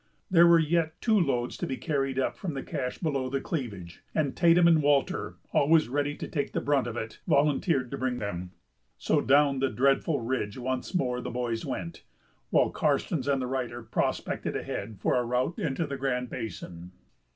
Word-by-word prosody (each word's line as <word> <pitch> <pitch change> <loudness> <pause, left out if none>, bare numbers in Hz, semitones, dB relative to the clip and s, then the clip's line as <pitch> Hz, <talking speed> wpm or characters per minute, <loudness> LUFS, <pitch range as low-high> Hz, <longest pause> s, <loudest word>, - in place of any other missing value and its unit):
There 170 -1 +7
were 170 0 +7
yet 160 0 +1
two 220 -3 +3
loads 125 -8 0
to - - -3
be 130 - -3
carried 135 -4 -1
up 135 - 0
from 170 -7 -5
the 135 - -4
cache 125 -2 -4
below 140 -6 -1
the 135 +1 -1
cleavage, 100 - -5
and 145 -4 0
Tatum 170 0 +5
and 165 -2 +5
Walter, 145 -1 +1 0.2
always 155 -1 +4
ready 145 +2 -1
to - - -6
take 140 -3 -3
the - - 0
brunt 140 -3 +1
of 120 0 -5
it, 110 -1 -6
volunteered 140 -2 +2
to 140 - -4
bring 130 -1 -1
them. 90 -5 -4 0.5
So - - +1
down 140 0 +4
that 135 0 0
dreadful 140 +4 +2
ridge 115 -3 -2
once 130 +7 -3
more 125 -7 0
the - - -5
boys 120 -2 -3
went, 85 -2 -5 0.5
while - - +3
Karstens 145 -6 0
and 140 -1 +2
the 130 - -2
writer 125 -2 -3
prospected 110 - -2
ahead 105 +1 -4
for - - +1
a 125 - +2
route 125 +7 -1
into 160 +1 -1
the 140 -2 -5
Grand 125 -2 -2
Basin. 90 -6 -7
135 Hz, 190 wpm, -28 LUFS, 120-150 Hz, 0.5 s, There